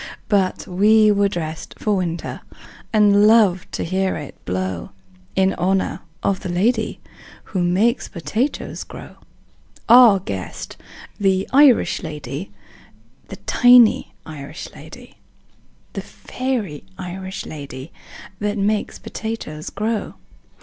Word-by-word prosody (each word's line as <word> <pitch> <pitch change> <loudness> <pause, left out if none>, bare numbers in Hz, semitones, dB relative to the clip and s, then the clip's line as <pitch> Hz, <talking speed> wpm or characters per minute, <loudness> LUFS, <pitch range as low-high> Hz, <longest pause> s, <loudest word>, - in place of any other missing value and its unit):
But 195 -3 +1
we 210 +3 +4
were 200 -1 +2
dressed 160 -4 -5
for 210 -2 0
winter, 170 -2 -3 0.5
And 210 -1 +5
loved 210 -5 +4
to - - -2
hear 190 +2 0
it 150 -3 -7
blow 95 -1 -3 0.5
In 190 0 +3
honor 190 +1 0 0.2
of 195 -2 +1
the - - -6
lady 220 +6 0 0.4
Who 185 - -3
makes 205 +8 +2
potatoes 220 - -3
grow - - -11 0.7
Our 235 -4 +8
guest, 95 - -6 0.4
the 190 -1 +1
Irish 275 -3 +5
lady, 150 0 -6 0.8
The - - -8
tiny 245 -2 +5
Irish 145 -3 -8
lady, - - -13 0.8
The - - -4
fairy 240 - -4
Irish 190 +1 -6
lady 140 0 -8 0.5
That 210 0 -1
makes 205 +1 0
potatoes 215 -9 -6
grow. 215 +1 -3
195 Hz, 110 wpm, -21 LUFS, 170-215 Hz, 0.8 s, Our